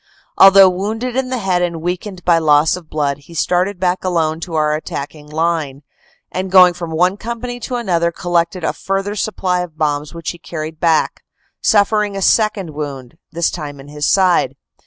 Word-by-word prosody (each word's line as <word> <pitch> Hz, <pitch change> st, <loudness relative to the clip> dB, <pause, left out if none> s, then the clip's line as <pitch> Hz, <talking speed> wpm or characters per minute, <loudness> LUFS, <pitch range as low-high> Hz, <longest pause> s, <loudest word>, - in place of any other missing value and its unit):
Although 195 Hz, -1 st, +8 dB
wounded 220 Hz, +7 st, -3 dB
in 265 Hz, -1 st, -1 dB
the 255 Hz, -, -2 dB
head 190 Hz, -5 st, 0 dB
and 170 Hz, -2 st, -1 dB
weak 175 Hz, +3 st, -3 dB
ened 190 Hz, -4 st, -9 dB
by 170 Hz, -2 st, +4 dB
loss 150 Hz, 0 st, +3 dB
of 175 Hz, -4 st, -11 dB
blood, 145 Hz, -2 st, -1 dB
he 155 Hz, +4 st, -15 dB
started 180 Hz, +3 st, 0 dB
back 180 Hz, 0 st, 0 dB
alone 165 Hz, -3 st, 0 dB
to 165 Hz, -1 st, -6 dB
our 150 Hz, -1 st, +2 dB
attacking 150 Hz, -1 st, -6 dB
line, 155 Hz, -3 st, -2 dB, 0.5 s
and 185 Hz, +1 st, -3 dB
going 180 Hz, -1 st, +7 dB
from 175 Hz, -1 st, -6 dB
one 180 Hz, +4 st, +1 dB
company 235 Hz, +2 st, -5 dB
to 250 Hz, +1 st, -4 dB
another 175 Hz, -8 st, 0 dB
collected 170 Hz, +1 st, -1 dB
a -, -, 0 dB
fur 195 Hz, 0 st, -2 dB
ther 205 Hz, +1 st, -4 dB
supply 185 Hz, -3 st, -1 dB
of 175 Hz, -3 st, -6 dB
bombs 150 Hz, -1 st, -1 dB
which 165 Hz, -1 st, -5 dB
he 175 Hz, -, -13 dB
carried 155 Hz, -1 st, -6 dB
back, 165 Hz, -2 st, +1 dB, 0.4 s
suffering 210 Hz, -1 st, +2 dB
a -, -, -4 dB
second 210 Hz, -6 st, +2 dB
wound, 145 Hz, -2 st, -7 dB
this 170 Hz, 0 st, 0 dB
time 145 Hz, -4 st, -7 dB
in 145 Hz, +2 st, -12 dB
the 150 Hz, -, -10 dB
side. 185 Hz, +4 st, +3 dB
175 Hz, 190 wpm, -17 LUFS, 155-195 Hz, 0.5 s, Although